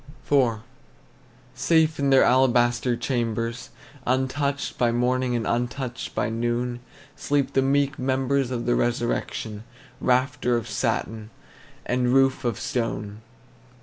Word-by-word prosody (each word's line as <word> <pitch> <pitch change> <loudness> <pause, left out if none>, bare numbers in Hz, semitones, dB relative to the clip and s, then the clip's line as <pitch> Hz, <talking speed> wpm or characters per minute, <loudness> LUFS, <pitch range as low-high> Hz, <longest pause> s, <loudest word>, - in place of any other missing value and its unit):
IV. 125 -6 +2 0.9
Safe 160 -2 +2
in 140 -1 +1
their 135 -1 +6
alabaster 120 -1 +3
chambers, 115 -2 -2 0.4
Untouched 135 +2 -1
by 120 -1 +3
morning 125 +1 +1
and 115 -2 -1
untouched 125 +1 -3
by - - 0
noon, 120 +2 -2 0.4
Sleep 145 -2 -1
the 135 - +3
meek 140 +1 +1
members 130 0 0
of 120 -2 -3
the 120 - +2
resurrection, 120 -3 -2 0.4
Rafter 125 -1 +1
of 115 - -5
satin, 110 -1 -2 0.6
and 125 0 +1
roof 135 0 +3
of 120 -4 -1
stone. 110 -3 -3
125 Hz, 115 wpm, -24 LUFS, 120-135 Hz, 0.9 s, their